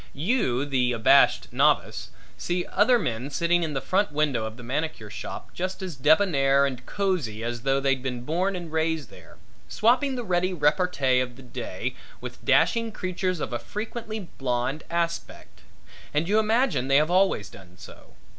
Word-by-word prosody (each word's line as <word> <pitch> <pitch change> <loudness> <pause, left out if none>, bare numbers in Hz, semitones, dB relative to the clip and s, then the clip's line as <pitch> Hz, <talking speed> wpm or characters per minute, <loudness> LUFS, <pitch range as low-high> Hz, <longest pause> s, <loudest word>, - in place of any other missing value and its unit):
You, 145 - +1
the 125 -3 +1
abashed 115 -2 +4
novice, - - +1 0.3
see 175 0 -2
other 220 +6 +3
men 125 - -3
sitting 170 +4 +1
in 155 -3 -2
the - - +1
front 200 0 +1
window 145 -6 0
of 110 +1 -7
the 125 - -11
manicure 130 -4 -3
shop - - -8
just 185 +2 -4
as 180 -4 -5
debonair 140 -2 +4
and 130 -2 -4
cozy 170 - -2
as 120 0 -3
though 135 +2 +1
they'd 135 -1 +1
been 125 -2 -4
born 180 +8 0
and 175 -3 -7
raised 160 -4 -1
there, - - -15 0.3
swapping 255 +4 +2
the 245 - -3
ready 185 -2 0
repartee 150 -4 +2
of 125 -1 -3
the 135 - -13
day 125 -1 -5 0.3
with - - -9
dashing 230 -1 +3
creatures 185 -3 -2
of 125 - -4
a 120 - -1
frequently 220 0 -5 0.2
blonde 130 +3 -1
aspect, 170 0 -4 0.5
and 155 +3 +1
you 210 +3 +3
imagine 220 - +1
they 135 - +3
have 155 +3 +2
always 185 - +2
done 90 -2 -15
so. - - -14
155 Hz, 170 wpm, -25 LUFS, 130-185 Hz, 0.5 s, abashed